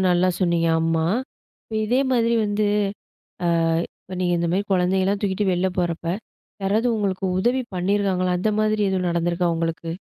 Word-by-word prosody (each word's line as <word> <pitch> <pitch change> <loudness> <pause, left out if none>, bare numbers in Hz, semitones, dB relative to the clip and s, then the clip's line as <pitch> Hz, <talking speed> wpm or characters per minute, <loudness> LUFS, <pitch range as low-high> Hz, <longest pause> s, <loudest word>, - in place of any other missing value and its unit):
நல்லா 180 +1 +3
சொன்னீங்க. 170 -2 +1
ஆம்மா. 165 0 +1 0.6
இப்போ 220 - -9
இதே 245 +5 +2
மாதிரி 235 -1 +2
வந்து. 205 0 0 0.8
ஆ. - - +2 0.5
இப்ப 185 - -8
நீங்க 180 -1 +1
இந்த 170 0 0
மாதிரி 195 +3 +1
குழந்தைங்களலாம் 190 +2 +1
தூக்கிட்டு 200 0 0
வெள்ல 185 +1 +1
போறப்போ, 170 -1 -1 0.5
யாராவது 215 +5 +1
உங்களுக்கு 195 -2 -1
உதவி 245 +6 +1
பண்ணியிருக்காங்களா? 185 -1 +1
அந்த 215 +4 +1
மாதிரி 215 0 +1
எதுவும் 185 -2 0
நடந்துருக்கா 170 +1 0
உங்களுக்கு? 165 0 -3
185 Hz, 150 wpm, -23 LUFS, 175-205 Hz, 0.8 s, நல்லா